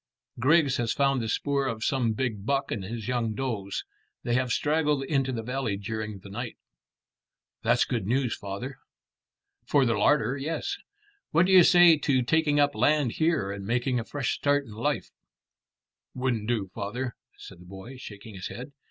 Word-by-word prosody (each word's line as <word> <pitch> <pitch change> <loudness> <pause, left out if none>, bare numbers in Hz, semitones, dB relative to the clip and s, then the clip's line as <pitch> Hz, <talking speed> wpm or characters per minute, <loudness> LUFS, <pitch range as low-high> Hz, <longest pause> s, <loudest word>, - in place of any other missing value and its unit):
Griggs 145 +2 +4
has 115 -2 0
found 135 -2 +2
the 110 - -3
spoor 140 +3 0
of 115 -3 -3
some 120 -4 +1
big 110 -4 -2
buck 140 +4 0
and 100 - -2
his 110 +3 -6
young 120 -3 -1
does. 110 -7 -3 0.4
They 120 - -1
have 125 +1 +1
straggled 150 -1 +1
into 135 -2 0
the 115 -3 -3
valley 125 -4 -2
during 110 0 -4
the 100 - -11
night." 120 +3 -5 1.0
"That's - - +3
good 110 -6 -2
news, 125 0 +1
father." 100 +7 -6 0.9
"For 140 -2 +4
the 115 - +2
larder: 135 +5 +2
yes. 165 - -3 0.5
What 170 +3 +4
do 190 - +1
you 185 -2 +9
say 175 -2 +7
to 130 -4 +2
taking 150 +2 +2
up 145 0 +3
land 150 -5 +2
here 155 -11 +2
and 100 0 -6
making 125 +4 0
a - - -3
fresh 135 +1 -2
start 145 0 +1
in 115 - -12
life?" 135 +7 -2 1.0
"Wouldn't 125 -4 -1
do, 105 -6 -1
father," 115 +5 -4 0.2
said 90 - -12
the 90 - -14
boy, 95 +8 -10
shaking 105 -3 -10
his 95 -1 -6
head. 125 +4 -8
125 Hz, 175 wpm, -27 LUFS, 110-140 Hz, 1.0 s, you